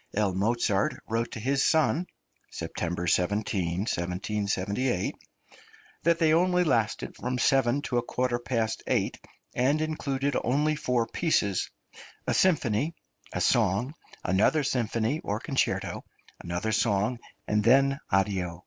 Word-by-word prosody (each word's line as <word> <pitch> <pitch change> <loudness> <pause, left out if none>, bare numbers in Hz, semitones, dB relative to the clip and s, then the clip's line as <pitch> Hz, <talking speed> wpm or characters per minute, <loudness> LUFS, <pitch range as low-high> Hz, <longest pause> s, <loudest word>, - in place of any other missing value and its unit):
L. 100 -2 +1
Mozart 105 0 +1
wrote 115 +1 -1
to - - -5
his 135 +4 +1
son 160 +2 +2 0.4
(September 85 +1 -4
17, 90 -1 0
1778) 100 +3 -1 0.9
that 170 0 +3
they 160 -2 +3
only 180 +2 +3
lasted 115 -9 0
from 125 +1 -3
seven 135 +2 +2
to 120 - 0
a - - -1
quarter 125 0 -1
past 115 -2 -1
eight, - - 0 0.3
and 135 +5 +2
included 140 -3 -1
only 150 +5 +1
four 125 -5 0
pieces 105 - 0 0.6
a - - 0
symphony, 155 - +2 0.4
a - - -3
song, 120 +10 +2 0.3
another 105 +11 +2
symphony 120 +2 0
or 105 +2 -2
concerto, 135 +2 -1 0.4
another 90 +5 -2
song, 110 +2 +1 0.3
and 105 0 +1
then 135 +4 +4
addio. 95 -3 0
120 Hz, 120 wpm, -28 LUFS, 100-140 Hz, 0.9 s, then